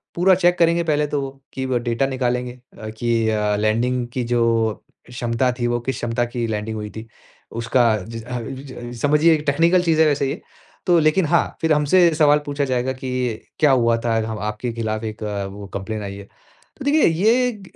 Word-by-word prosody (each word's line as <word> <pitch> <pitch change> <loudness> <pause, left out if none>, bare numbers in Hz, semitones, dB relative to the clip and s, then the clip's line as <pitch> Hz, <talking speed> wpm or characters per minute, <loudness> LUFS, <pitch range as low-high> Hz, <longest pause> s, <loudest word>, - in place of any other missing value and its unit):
पूरा 185 +2 +4
चेक 175 -1 +2
करेंगे 170 0 +3
पहले 150 -2 +1
तो 145 -1 -2
वो। 135 - -4 0.2
कि 130 - -3
व 130 -1 0
डाटा 120 +3 0
निकालेंगे 125 -2 -1 0.3
अ, 110 - -7
कि 115 0 0
अ, 105 -1 +1
लैंडिंग 120 +3 0
की 125 - -1
जो 115 -2 +1 0.3
क्षमता 120 +1 0
थी, 120 - 0
वो 120 0 0
किस 130 +1 -3
क्षमता 120 0 -1
की 120 0 -3
लैंडिंग 110 0 -3
हुई 105 0 -5
थी? 110 +1 -8 0.5
उसका 120 +2 +2 0.3
जि 115 0 -7
अ, 125 +2 -5
जि 130 +4 -7
जि 135 -2 -10
अ, 120 0 -8
समझिए 150 +3 +4
एक 150 - -4
टेक्निकल 170 +5 +3
चीज़ 160 -2 +2
है 160 - +6
वैसे 145 -2 +1
ये 145 - -5 0.5
तो। 175 -2 +5
लेकिन 155 +4 +3
हाँ, 170 +2 +1
फिर 160 -1 +3
हमसे 165 +4 +4
सवाल 150 -1 +4
पूछा 145 0 -1
जाएगा 130 0 -1
कि, 125 -3 -3 0.2
"क्या 150 -2 +5
हुआ 115 -3 +3
था? 115 - +1 0.2
हव 110 - -5
आपके 105 +3 -3
ख़िलाफ़ 110 -1 -3
एक 110 0 -6
वो, 100 -1 -5
कंप्लेंट 105 +2 -4
आई 100 0 -6
है।" 100 - -9 0.6
तो 275 - -7
देखिए, 300 +1 +4
ये 220 +6 +2
125 Hz, 205 wpm, -21 LUFS, 115-150 Hz, 0.6 s, है